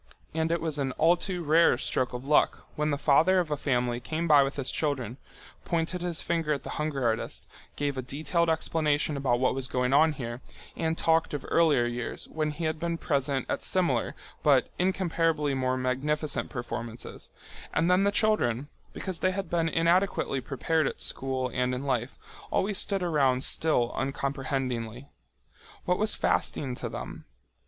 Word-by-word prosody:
And 160 +1 0
it 170 - 0
was 155 -3 -1
an 135 -2 -1
all 165 +5 +4
too 180 0 -4
rare 160 -3 +4
stroke 125 0 -1
of 125 +1 -6
luck 150 +1 +2
when 150 0 0
the 145 - 0
father 160 +7 +4
of 175 -4 0
a - - +2
family 125 -4 0
came 155 +7 -3
by 150 -3 +7
with 135 0 -1
his 135 -2 -1
children, 130 -6 -2 0.5
pointed 170 +1 -1
his 175 -2 -2
finger 165 -3 -1
at 140 - -4
the - - -6
hunger 150 -3 -2
artist, 115 -1 -2 0.3
gave 145 -2 -2
a - - -1
detailed 160 +6 0
explanation 155 -2 +1
about 130 -3 +1
what 130 - +2
was 130 0 -1
going 125 +1 0
on 155 +2 +5
here, 120 -3 -6 0.3
and 160 0 -1
talked 160 -2 +2
of 145 - -6
earlier 150 -7 +4
years, 120 0 -4
when 155 -1 -1
he 150 +3 -5
had 155 -1 -1
been 170 0 -2
present 140 -4 -1
at - - -2
similar 145 -11 +1 0.3
but - - +3
incomparably 165 -5 +1
more 130 -1 0
magnificent 140 +4 -1
performances, 120 -1 -6 0.4
and 165 +2 +1
then 180 +2 +4
the 200 - +3
children, 145 - +1 0.2
because 185 -4 -5
they 185 - +2
had 190 -2 -4
been 165 -1 +1
inadequately 170 -4 +1
prepared 155 +4 0
at - - -5
school 130 -1 -1
and 125 0 0
in 125 - -5
life, 125 -2 -1 0.3
always 200 0 +2
stood 195 -2 +2
around 135 -6 +2
still 125 -7 +3
uncomprehendingly. 135 -3 -3 0.7
What 180 0 +1
was 215 0 +2
fasting 135 -3 0
to - - -5
them? - - -7
145 Hz, 175 wpm, -28 LUFS, 130-165 Hz, 0.7 s, by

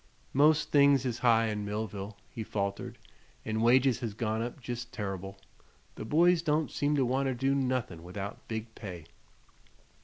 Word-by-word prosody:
"Most 150 +2 +4
things 140 -2 +5
is 120 -2 -2
high 115 -2 +4
in 105 -1 -3
Millville," 105 -1 -4
he 115 - -6
faltered, 100 -2 -3 0.5
"an' 110 0 -1
wages 125 +1 +4
has 110 -4 -4
gone 110 0 -1
up 120 +4 -5
jest 120 -1 -6
terr'ble. 95 -2 -5 0.6
The - - -7
boys 170 +6 +4
don't 155 -1 0
seem 145 +1 +1
to 135 -3 +2
wanter 130 +1 0
do 135 +3 +1
nuthin' 130 -10 -1
without 95 +4 -7
big 110 0 -5
pay." 90 -8 -8
115 Hz, 155 wpm, -30 LUFS, 105-135 Hz, 0.6 s, things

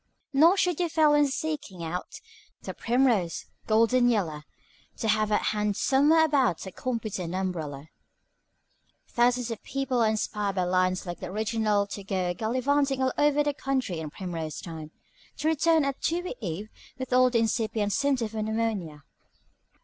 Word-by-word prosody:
"Nor 330 +7 +6
should 360 -4 +1
you 350 -1 +1
fail 310 -2 +4
when 295 -1 +4
seeking 280 - -4
out 175 +3 -5 0.4
The - - -5
primrose, 235 -8 +1 0.2
golden 230 +3 +4
yeller, 160 -10 -1 0.5
To 225 - -2
have 215 0 +2
at 210 - +2
hand 210 -1 -1
somewhere 300 +4 +4
about 265 - +1
A 190 - -7
competent 215 -7 -4
umbrella. 160 -7 -3 1.2
Thousands 245 0 +1
of 225 - -5
people 270 -3 -1
are 220 - +4
inspired 210 -2 -2
by 185 - +1
lines 185 +1 +1
like 175 -1 -6
the - - -6
original 215 +1 0
to 200 0 -7
go 185 -2 -1
gallivanting 265 +7 0
all 260 - +1
over 295 0 +3
the 290 0 0
country 260 -11 -2
in 155 -1 -5
primrose 165 -3 -5
time, 160 -3 -8 0.5
to 310 - -1
return 320 0 +3
at 275 -1 -3
dewy 350 +2 -1
eve 200 +2 -4 0.3
with 260 -1 -4
all 255 0 +5
the 245 - +1
incipient 220 -2 0
symptoms 255 -5 0
of 215 -1 -2
pneumonia. 215 -9 -2
225 Hz, 155 wpm, -27 LUFS, 185-270 Hz, 1.2 s, Nor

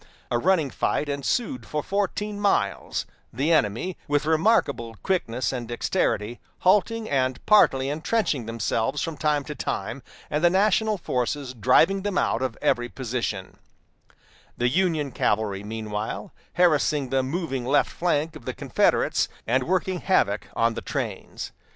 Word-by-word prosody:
A 120 - +2
running 165 -3 +2
fight 150 - 0
ensued 190 - -1
for 150 -1 -2
fourteen 205 +1 -2
miles, 205 -1 0 0.3
the 140 +8 0
enemy, 120 - 0
with 145 0 +1
remarkable 155 - +2
quickness 130 -11 0
and 120 -2 -4
dexterity, 120 -1 -1 0.2
halting 215 +4 +3
and 130 -2 +1
partly 135 -11 +5
intrenching 150 - -1
themselves 115 +4 -1
from 165 -2 -3
time 150 -1 +1
to 150 - -6
time, - - -4 0.3
and 150 +3 0
the 175 - +7
national 210 +3 +2
forces 130 -3 -2
driving 145 - +4
them 200 -1 -2
out - - +1
of 130 -4 -2
every 120 0 +1
position; 120 -7 -4 1.0
the 120 0 +2
Union 160 -3 +1
cavalry, 105 -3 0
meanwhile, 105 0 -4 0.2
harassing 150 -5 +2
the 135 0 +3
moving 135 -2 -3
left 135 +4 +2
flank 160 -2 0
of 135 - -11
the - - -4
Confederates, - - +1 0.2
and 125 +2 +1
working 185 0 0
havoc 105 - +1
on 115 0 +2
the - - -5
trains. - - -4
145 Hz, 140 wpm, -25 LUFS, 120-180 Hz, 1.0 s, the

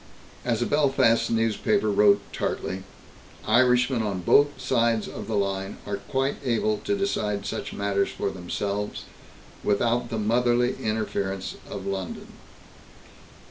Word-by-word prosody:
As 120 -1 0
a - - 0
Belfast 135 -6 +3
newspaper 115 - +1
wrote 100 0 +5
tartly: 95 +1 -2 0.6
"Irishmen 125 +1 +3
on 100 -4 -2
both 145 +9 +4
sides 115 -3 +1
of - - -7
the 110 - -2
line 100 -1 -1
are 100 -1 -3
quite 135 +1 -1
able 110 -4 +1
to 205 -1 -1
decide 105 - -1
such - - -4
matters 100 -1 0
for - - -3
themselves, 100 +3 -3 0.6
without 115 +4 +1
the 115 - -3
motherly 120 +3 +2
interference 100 -3 -2
of 100 -1 -6
London." 95 -2 -4
110 Hz, 125 wpm, -26 LUFS, 100-120 Hz, 0.6 s, wrote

